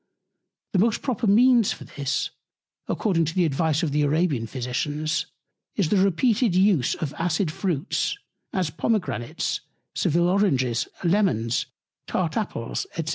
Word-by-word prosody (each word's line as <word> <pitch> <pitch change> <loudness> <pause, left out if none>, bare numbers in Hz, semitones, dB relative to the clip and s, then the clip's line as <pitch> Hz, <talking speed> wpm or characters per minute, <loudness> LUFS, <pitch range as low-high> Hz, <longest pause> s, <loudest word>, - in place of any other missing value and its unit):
The 190 - +3
most 220 +3 +2
proper 245 -4 -1
Means 235 +1 +5
for - - -10
this, 140 -1 -2 0.6
according 175 -6 +1
to 165 - -4
the 180 -2 +3
Advice 160 +2 +1
of 155 - 0
the 150 +1 +1
Arabian 145 -5 +1
Physicians, 145 +6 -2 0.5
is 190 -7 +1
the 205 - +3
repeated 200 +3 +2
Use 185 -8 +3
of 150 -3 -4
acid 165 0 0
Fruits, 170 -1 -1 0.3
as 180 -5 -1
Pomegranates, 160 - -1 0.3
Sevil 170 +3 +2
Oranges, 135 - +1 0.2
Lemons, 170 - +1 0.4
tart - - -1
Apples, - - -3
&c. - - -1
170 Hz, 130 wpm, -25 LUFS, 145-200 Hz, 0.6 s, Means